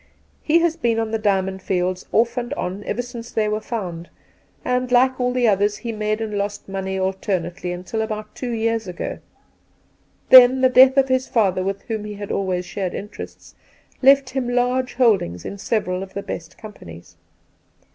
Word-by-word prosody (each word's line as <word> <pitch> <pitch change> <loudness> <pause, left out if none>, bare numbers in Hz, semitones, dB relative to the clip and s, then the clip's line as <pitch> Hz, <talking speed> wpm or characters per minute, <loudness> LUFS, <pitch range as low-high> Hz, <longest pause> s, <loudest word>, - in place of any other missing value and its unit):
He 320 +2 +3
has 335 -1 +1
been 235 -7 0
on 225 -1 -1
the 225 - -1
Diamond 190 -2 0
Fields 185 0 -2
off 235 +2 +2
and 245 +2 -3
on 190 -1 -4
ever 245 - -2
since 235 -1 -9
they 215 -1 0
were 210 +1 -1
found, 180 -7 -5 0.6
and, 250 0 0
like 255 +1 +3
all 250 0 0
others, 205 0 +2
he 230 +2 -5
made 215 0 -2
and 215 -2 -3
lost 205 +1 -4
money 190 0 -3
alternately 185 -2 -2
until 180 +5 -4
about 215 -1 -5
two 250 - -5
years 225 -2 -1
ago; 180 -1 -5 1.1
then 255 0 +9
the 260 - +5
death 260 +1 +6
of 270 -1 +5
his 260 0 +1
father, 195 -6 +1
with 195 +1 -3
whom 220 -3 -4
he 210 0 -6
had 205 0 -6
always 185 -2 -1
shared 185 -1 -4
interests, 210 +2 -9 0.5
left 275 0 +5
him 260 -2 -2
large 250 +1 0
holdings 195 - +2
in 200 - -6
several 190 -4 -1
of 190 0 -9
the 200 - -4
best 165 -1 -7
companies. 90 - -12
215 Hz, 175 wpm, -21 LUFS, 190-245 Hz, 1.1 s, then